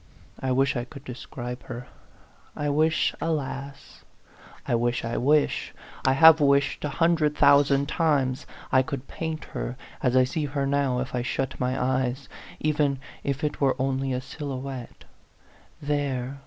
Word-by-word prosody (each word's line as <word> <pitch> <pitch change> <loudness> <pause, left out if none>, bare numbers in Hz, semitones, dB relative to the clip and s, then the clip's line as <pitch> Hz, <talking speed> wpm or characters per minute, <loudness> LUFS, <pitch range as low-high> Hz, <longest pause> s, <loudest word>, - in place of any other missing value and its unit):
I 130 - -1
wish 135 +2 +2
I 120 - -1
could 140 +2 -11
describe 125 0 -7
her. 125 +1 -7 0.7
I 145 0 -1
wish, 155 +1 +2
alas! 140 -3 -4 0.6
I - - 0
wish, 120 0 0
I 115 - -2
wish, 145 +3 +1 0.3
I 130 - +5
have 160 +2 +8
wished 140 0 +2
a 150 - -1
hundred 165 -3 +2
thousand 140 0 +5
times 145 -6 +1 0.2
I 130 - +5
could 140 -1 -5
paint 160 -1 -4
her, 125 - -4 0.2
as 125 -2 +1
I 130 - +6
see 145 +4 -2
her 140 0 -2
now 135 -3 +1
if 130 - -5
I 125 - 0
shut 130 +2 -3
my 130 +1 0
eyes 130 +1 0 0.3
even 150 -2 +1 0.3
if 140 +2 -2
it 150 - -2
were 135 -2 +3
only 135 0 0
a 125 0 -1
silhouette. 135 -3 -6 0.8
There 140 -2 -2
135 Hz, 155 wpm, -26 LUFS, 130-145 Hz, 0.8 s, have